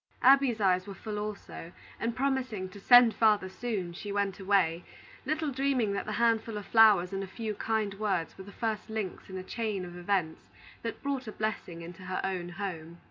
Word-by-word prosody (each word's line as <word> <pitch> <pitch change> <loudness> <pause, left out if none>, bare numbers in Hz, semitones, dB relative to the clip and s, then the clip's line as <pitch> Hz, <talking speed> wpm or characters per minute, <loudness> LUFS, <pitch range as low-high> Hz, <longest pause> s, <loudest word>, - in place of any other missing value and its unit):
Abby's 265 -3 +5
eyes 185 -2 +2
were 200 - -7
full 210 0 -5
also, 210 -4 -7 0.3
and 230 0 -2
promising 255 -7 -1
to 200 - -12
"send 245 +2 +7
father 210 -3 +3
soon," 190 -4 -4
she 205 +4 -6
went 200 -2 -1
away, 185 -4 +2 0.4
little 310 0 0
dreaming 260 -5 +1
that 200 - -3
the 215 - -2
handful 225 -1 +1
of 205 - -6
flowers 205 -5 +5
and 195 0 -2
a - - -6
few 220 +2 -4
kind 215 -1 -1
words 195 -5 -1
were 190 - -9
the 200 - -11
first 220 0 -3
links 215 -5 -4
in 190 - -6
a 185 - -5
chain 210 -3 -3
of 175 0 -9
events 175 -3 -2 0.3
that 230 - -5
brought 275 -3 -2
a - - -4
blessing 205 -6 -4
into 175 +2 -10
her 185 0 -2
own 180 -2 -2
home. 175 -3 -6
205 Hz, 195 wpm, -30 LUFS, 185-225 Hz, 0.4 s, send